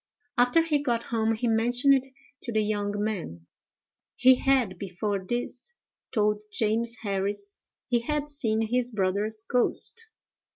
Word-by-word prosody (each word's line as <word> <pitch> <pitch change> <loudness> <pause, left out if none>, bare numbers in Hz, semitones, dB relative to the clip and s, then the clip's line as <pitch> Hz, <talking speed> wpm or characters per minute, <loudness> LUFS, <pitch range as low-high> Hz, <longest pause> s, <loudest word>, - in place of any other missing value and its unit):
After 245 +7 +4
he 305 -3 +1
got 240 -5 0
home 225 0 +2
he 235 +2 -2
mentioned 240 +4 +3
it 265 -1 +1 0.3
to 240 - -5
the 215 -1 +2
young 205 -1 -1
man. 165 - -4 0.7
He 260 +1 +7
had, 250 -8 +1
before 200 +1 -2
this, 245 - -4 0.4
told 210 -1 +1
James 225 +2 +1
Harris 200 0 -2 0.3
he 240 -1 +1
had 295 +4 -2
seen 225 -7 -1
his 245 0 +1
brother's 210 +1 -1
ghost. 355 - +1
225 Hz, 135 wpm, -27 LUFS, 205-250 Hz, 0.7 s, He